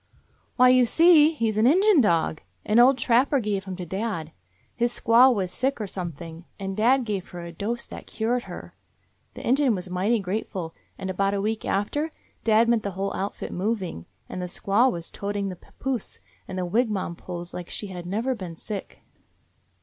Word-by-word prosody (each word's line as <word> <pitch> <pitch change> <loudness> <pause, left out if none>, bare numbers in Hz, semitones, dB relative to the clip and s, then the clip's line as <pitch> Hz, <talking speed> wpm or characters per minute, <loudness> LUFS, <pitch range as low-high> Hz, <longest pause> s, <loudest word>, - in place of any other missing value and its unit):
"Why, 255 0 +6
you 250 -1 +5
see, 325 +1 +6
he 230 -8 0
's 210 - -6
an 220 +2 +4
Injun 375 +2 +5
dog. 165 -6 +1 0.2
An 215 +2 +4
old 255 +2 +6
trapper 255 +4 +3
gave 205 -4 -2
him 190 -1 -5
to 180 -1 -6
dad. 190 -4 -3 0.4
His 240 0 +1
squaw 240 +4 +6
was 190 -6 -1
sick, 265 +6 -1
or 215 - -2
something, 170 -3 -7
and 195 -1 -4
dad 250 +4 +3
gave 200 -4 -3
her 175 -1 -8
a 170 0 -7
dose 215 +8 -3
that - - -10
cured 240 +3 -1
her. - - -9 0.6
The - - -7
Injun 260 -1 +3
was 180 -1 -6
mighty 200 +6 +1
grateful, 185 -3 -4 0.2
and 190 0 -4
about 195 +2 0
a - - -1
week 220 +2 -2
after, 290 +11 -1 0.3
dad 225 +1 +4
met 235 -1 +3
the 205 - -3
whole 195 +1 -1
outfit 195 +2 -4
moving, 185 - -3 0.2
and 185 - -5
the 180 - -3
squaw 205 +8 +2
was 170 -4 -6
toting 200 0 -3
the 185 - -6
papoose 255 +7 -5 0.3
and 190 - -6
the 180 - -1
wigwam 205 -3 0
poles 175 0 -7
like 175 -1 -6
she - - -5
had 175 -1 -7
never 225 +8 -1
been 185 -8 -7
sick. 200 +4 -7
205 Hz, 190 wpm, -25 LUFS, 185-240 Hz, 0.6 s, Why